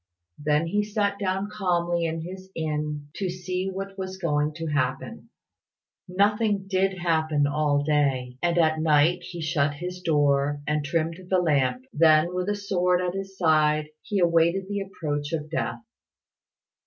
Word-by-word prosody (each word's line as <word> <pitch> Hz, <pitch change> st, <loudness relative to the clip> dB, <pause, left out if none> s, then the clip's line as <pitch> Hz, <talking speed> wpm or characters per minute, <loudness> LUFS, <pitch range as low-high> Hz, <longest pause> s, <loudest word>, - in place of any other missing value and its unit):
Then 150 Hz, +2 st, +2 dB
he 205 Hz, +5 st, 0 dB
sat 205 Hz, -1 st, -1 dB
down 195 Hz, 0 st, -1 dB
calmly 175 Hz, -4 st, 0 dB
in 165 Hz, 0 st, -2 dB
his 185 Hz, +3 st, -8 dB
inn 150 Hz, -2 st, -3 dB
to 190 Hz, -2 st, -1 dB
see 185 Hz, +1 st, -3 dB
what 195 Hz, +1 st, -6 dB
was 190 Hz, 0 st, -5 dB
going 150 Hz, -4 st, 0 dB
to 165 Hz, 0 st, -5 dB
happen. 140 Hz, -5 st, -2 dB, 0.8 s
Nothing 205 Hz, +2 st, +1 dB
did 190 Hz, 0 st, +1 dB
happen 160 Hz, -4 st, +1 dB
all 145 Hz, 0 st, +1 dB
day, 135 Hz, -4 st, +1 dB
and 175 Hz, 0 st, +1 dB
at 160 Hz, -2 st, +3 dB
night 155 Hz, +2 st, +3 dB
he 175 Hz, -1 st, -7 dB
shut 150 Hz, -2 st, 0 dB
his 180 Hz, +3 st, -6 dB
door 145 Hz, -3 st, +2 dB
and 150 Hz, 0 st, 0 dB
trimmed 165 Hz, +3 st, -1 dB
the 185 Hz, -, +3 dB
lamp; 155 Hz, -, +1 dB
then, 160 Hz, +1 st, +4 dB
with 180 Hz, +2 st, -1 dB
a 205 Hz, -, +1 dB
sword 180 Hz, -3 st, +1 dB
at 180 Hz, -1 st, -1 dB
his 195 Hz, 0 st, -6 dB
side, 155 Hz, -3 st, +3 dB
he 210 Hz, -2 st, -3 dB
awaited 170 Hz, +1 st, +3 dB
the 205 Hz, 0 st, -2 dB
approach 150 Hz, -6 st, -4 dB
of 155 Hz, -1 st, -3 dB
death. 165 Hz, -, -2 dB
170 Hz, 155 wpm, -25 LUFS, 150-190 Hz, 0.8 s, then